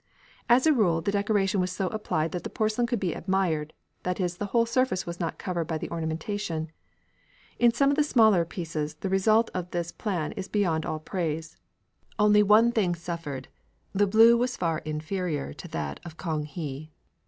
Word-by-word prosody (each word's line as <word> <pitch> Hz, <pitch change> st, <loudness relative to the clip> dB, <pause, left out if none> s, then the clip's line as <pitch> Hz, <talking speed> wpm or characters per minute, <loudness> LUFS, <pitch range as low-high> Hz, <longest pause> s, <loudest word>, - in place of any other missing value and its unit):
As 245 Hz, +4 st, +5 dB
a 315 Hz, -, +6 dB
rule, 180 Hz, -, +2 dB
the 200 Hz, -, -1 dB
decoration 200 Hz, -1 st, +1 dB
was 180 Hz, 0 st, -1 dB
so 190 Hz, 0 st, -2 dB
applied 175 Hz, -7 st, -1 dB
that 180 Hz, -, -4 dB
the -, -, -4 dB
porcelain 220 Hz, +2 st, 0 dB
could 240 Hz, -2 st, -1 dB
be 180 Hz, -4 st, -1 dB
admired 170 Hz, -5 st, -1 dB, 0.3 s
that 180 Hz, +1 st, -2 dB
is, 175 Hz, -2 st, -1 dB
the 205 Hz, -, -3 dB
whole 230 Hz, +3 st, +2 dB
surface 235 Hz, -5 st, 0 dB
was 170 Hz, 0 st, -6 dB
not 165 Hz, -2 st, -3 dB
covered 175 Hz, -3 st, -2 dB
by 160 Hz, 0 st, -2 dB
the -, -, -6 dB
ornamentation. 165 Hz, 0 st, -3 dB, 0.9 s
In 240 Hz, -1 st, +6 dB
some 275 Hz, +4 st, +3 dB
of -, -, +1 dB
the 300 Hz, -, +3 dB
smaller 220 Hz, -, +4 dB
pieces 160 Hz, -3 st, -4 dB
the 195 Hz, -, -2 dB
result 215 Hz, +4 st, +3 dB
of 180 Hz, -1 st, -4 dB
this 175 Hz, -1 st, -3 dB
plan 180 Hz, -8 st, -3 dB
is 195 Hz, -3 st, -6 dB
beyond 170 Hz, -7 st, 0 dB
all 155 Hz, -, -2 dB
praise. 160 Hz, -1 st, -3 dB, 0.6 s
Only 210 Hz, 0 st, +5 dB
one 215 Hz, +3 st, +5 dB
product 185 Hz, -7 st, +1 dB
suffered. 165 Hz, -6 st, -5 dB, 0.5 s
The 205 Hz, +1 st, +3 dB
blue 225 Hz, +4 st, +7 dB
was 245 Hz, +1 st, 0 dB
far 165 Hz, -3 st, 0 dB
inferior 155 Hz, -, -3 dB
to -, -, -10 dB
that 75 Hz, -2 st, -4 dB
of 170 Hz, -1 st, -10 dB
Kang 155 Hz, -4 st, -2 dB
he. 150 Hz, -1 st, -6 dB
180 Hz, 190 wpm, -27 LUFS, 160-210 Hz, 0.9 s, blue